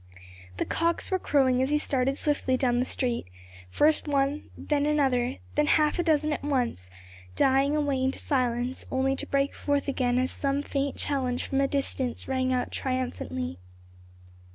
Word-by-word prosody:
The - - -1
cocks 335 +3 -1
were 375 - +2
crowing 260 -6 +2
as 265 - +1
he 300 - +3
started 270 -2 0
swiftly 280 -3 +1
down 245 -2 +1
the 250 - +1
street, 245 - -2 0.4
first 305 - +2
one, 280 +1 0
then 295 -1 0
another, 265 -4 +1 0.2
then 300 0 +2
half 305 +2 +3
a - - +2
dozen 305 -2 +2
at - - -5
once, 245 - -1 0.5
dying 270 +2 +3
away 285 -3 0
into 265 0 0
silence 250 -1 0
only 265 +1 +1
to - - -5
break 275 0 +1
forth 285 -1 -1
again 250 -3 +1
as 255 +1 +1
some 280 0 -1
faint 275 -1 -2
challenge 255 -3 -1
from 270 0 0
a 275 - +3
distance 270 -3 -2
rang 260 -1 0
out 250 -1 -1
triumphantly. 90 - -3
270 Hz, 165 wpm, -27 LUFS, 255-290 Hz, 0.5 s, he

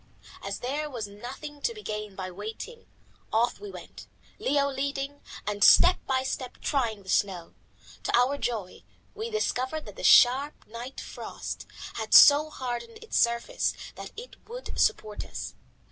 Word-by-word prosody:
As 200 0 -5
there 290 +4 -2
was 240 -6 -4
nothing 260 +8 -9
to 465 - -1
be 425 - -10
gained 210 -2 -5
by 185 -1 -4
waiting, 220 - -8 0.4
off 230 +2 +2
we 415 - -8
went, - - -11 0.3
Leo 280 0 +2
leading 280 +1 -3 0.2
and 205 0 0
step 360 +1 +8
by 260 -1 +1
step 255 -1 -4
trying 230 -7 -1
the - - -21
snow. 185 -3 0 0.5
To - - +3
our 265 +4 +2
joy 215 -7 -3 0.3
we 445 +2 -4
discovered 315 - -1
that - - -11
the - - -7
sharp 270 +4 +5
night 235 +4 -8
frost - - -7 0.3
had - - +1
so 295 +2 +9
hardened 260 - -5
its 455 - -2
surface 235 - +1 0.2
that - - -8
it 485 +2 -9
would - - -7
support 215 - +1
us. - - -6
260 Hz, 155 wpm, -28 LUFS, 220-300 Hz, 0.5 s, so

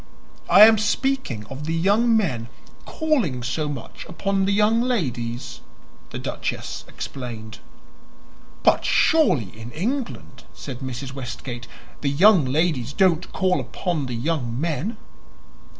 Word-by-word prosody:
"I 205 - +9
am 220 -1 +5
speaking 220 - -1
of 135 +6 -7
the 165 +1 -1
young 215 +7 +3
men 125 - -1 0.4
calling 240 - 0
so 150 +5 -2
much 140 -5 -7
upon 195 +2 0
the 195 - +1
young 210 +3 +3
ladies," 130 - -2 0.5
the - - -6
duchess - - -4
explained. 115 -4 -7 1.0
"But - - +4
surely 155 - +3
in 110 +1 -9
England," 170 - -4
said 130 -3 -7
Mrs. 130 0 -5
Westgate, 120 -2 -6 0.3
"the 140 - +1
young 175 +2 +5
ladies 140 -2 0
don't 180 -1 +2
call 185 -1 +1
upon 165 -7 -3
the 125 - -4
young 125 -2 -2
men?" 170 - -2
155 Hz, 125 wpm, -23 LUFS, 125-200 Hz, 1.0 s, I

